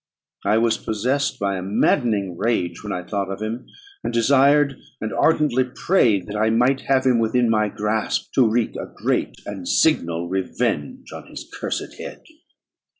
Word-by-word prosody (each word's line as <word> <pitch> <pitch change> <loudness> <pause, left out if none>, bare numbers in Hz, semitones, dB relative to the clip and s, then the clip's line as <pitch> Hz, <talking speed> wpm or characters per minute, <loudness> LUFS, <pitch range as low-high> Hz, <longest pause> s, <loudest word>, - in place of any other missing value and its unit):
I 110 - +3
was 115 0 +2
possessed 125 +6 -1
by 100 -1 -1
a - - -4
maddening 100 -1 +1
rage 90 -4 -1
when 105 - -5
I 90 - -3
thought 100 0 -3
of 95 - -5
him, 110 +3 -5 0.4
and - - -2
desired 140 +3 +3 0.2
and 110 - -4
ardently 150 -5 +3
prayed 125 - +1
that 105 - -7
I 110 +1 +2
might 125 +4 +2
have 135 -1 +2
him 125 -3 +4
within 115 +1 +2
my 105 -1 +2
grasp 105 +2 -2
to 125 -4 +4
wreak 115 0 0
a - - -5
great - - -2
and 95 -3 -6
signal 85 - +2
revenge 90 -5 -2
on - - -9
his - - -9
cursed - - -4
head. - - -8
110 Hz, 165 wpm, -22 LUFS, 100-125 Hz, 0.4 s, him